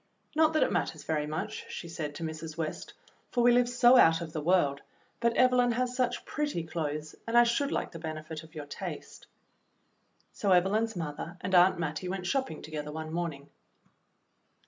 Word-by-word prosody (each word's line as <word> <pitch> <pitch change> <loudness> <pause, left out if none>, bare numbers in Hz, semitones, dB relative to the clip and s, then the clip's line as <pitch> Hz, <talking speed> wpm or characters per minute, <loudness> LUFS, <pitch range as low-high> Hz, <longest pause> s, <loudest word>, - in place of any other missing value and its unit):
"Not 315 0 +4
that 310 - +4
it - - 0
matters - - -2
very 150 -2 -1
much," 155 +1 -5
she 170 - -6
said 155 -3 -5
to 165 - -6
Mrs. 160 0 -6
West, 160 -2 -4 0.4
"for 240 - +1
we 245 - +7
live 245 0 +4
so 245 +1 +6
out 165 -7 +6
of 165 -2 -7
the 155 - -2
world, 150 -4 +2 0.4
but 235 0 +1
Evelyn 250 -1 +4
has 250 +1 -1
such 250 -1 -1
pretty 295 - -2
clothes, 155 -2 -4
and 230 +1 +2
I 240 - +9
should 240 +4 +1
like - - -2
the 165 - -8
benefit 155 0 -6
of 160 0 -16
your 150 -2 -6
taste." 145 - -8 1.1
So 200 -3 +2
Evelyn's 210 +5 +2
mother 165 +1 -5
and 185 +1 -4
Aunt 180 +1 +6
Mattie 165 +2 -3
went 190 -1 -4
shop 265 +8 0
ping 155 - -9
together 150 -1 -5
one 160 +1 -6
morning. 160 -5 -4
170 Hz, 190 wpm, -30 LUFS, 155-240 Hz, 1.1 s, I